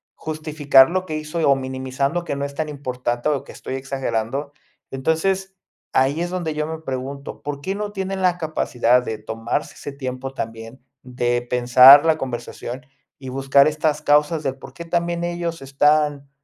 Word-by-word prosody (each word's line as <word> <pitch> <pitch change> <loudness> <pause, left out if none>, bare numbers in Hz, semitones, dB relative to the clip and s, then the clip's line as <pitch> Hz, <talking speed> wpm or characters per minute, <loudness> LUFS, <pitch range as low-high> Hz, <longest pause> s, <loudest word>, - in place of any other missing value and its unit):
justificar, 155 -3 +3
lo 185 +1 -1
que 155 - -4
hizo 155 +2 -4
o 140 - +6
minimizando 130 +4 -2
que 155 - -3
no 140 - -3
es 140 - -7
tan 155 +1 -2
importante, 125 -2 -2
o 145 -3 -1
que - - -11
estoy 130 - -6
exagerando. 135 0 -3 0.4
Entonces, 190 +8 -1 0.4
ahí 135 +4 +2
es 175 - -2
donde 175 -4 -2
yo 150 0 -2
me 160 0 -5
pregunto, 135 -1 -6
¿por 145 -1 -5
qué 190 +6 -3
no 205 0 -4
tienen 190 -1 -3
la 180 -1 +2
capacidad 125 -6 +1
de 110 -2 -4
tomarse 115 +6 -4
ese 145 - -7
tiempo 130 -1 -5
también, 115 +1 -7 0.2
de 120 -1 -1
pensar 125 +4 +8
la 160 -1 +3
conversación 125 -1 -6 0.3
y 130 -1 -8
buscar 135 +2 +4
estas 155 0 -1
causas 150 +2 +2
de 135 - 0
por 135 - -13
qué 170 - -8
también 170 0 -1
ellos 170 -2 -3
están, 145 +1 +1
140 Hz, 170 wpm, -21 LUFS, 130-160 Hz, 0.4 s, pensar